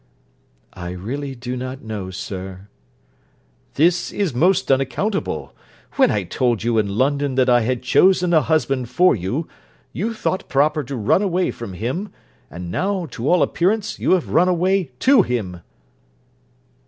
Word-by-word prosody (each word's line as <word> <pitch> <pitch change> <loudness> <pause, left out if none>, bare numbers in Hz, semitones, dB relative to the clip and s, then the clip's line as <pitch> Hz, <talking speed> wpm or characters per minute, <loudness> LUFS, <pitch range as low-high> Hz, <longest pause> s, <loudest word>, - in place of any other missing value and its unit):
'I 90 0 -6
really 135 +9 -5
do 125 +1 -5
not 130 +1 -6
know, 105 -4 -5
sir.' 95 +1 -7 1.1
'This 175 +4 +2
is 195 -9 -1
most 175 +5 +2
unaccountable. 135 +10 -1 0.4
When 270 -2 +3
I 105 - 0
told 120 +4 -1
you 115 -1 +2
in 100 -1 -2
London 140 +1 +1
that 130 -1 +3
I 120 0 +5
had 125 +2 -1
chosen 180 +5 +3
a 160 - +5
husband 135 -6 0
for 180 +8 +4
you, 115 - -3 0.5
you 225 +6 -3
thought 190 -3 -2
proper 150 +2 +2
to 135 - -5
run 115 - +2
away 185 -2 0
from 115 -5 -8
him; 130 - -4 0.4
and 85 +3 -7
now, 190 - -1
to 120 +5 -3
all 175 -3 +4
appearance, 205 +4 0
you - - +2
have 185 - 0
run 180 - +3
away 185 -1 +1
to 265 -4 +6
him.' 100 - -3
135 Hz, 155 wpm, -21 LUFS, 115-180 Hz, 1.1 s, to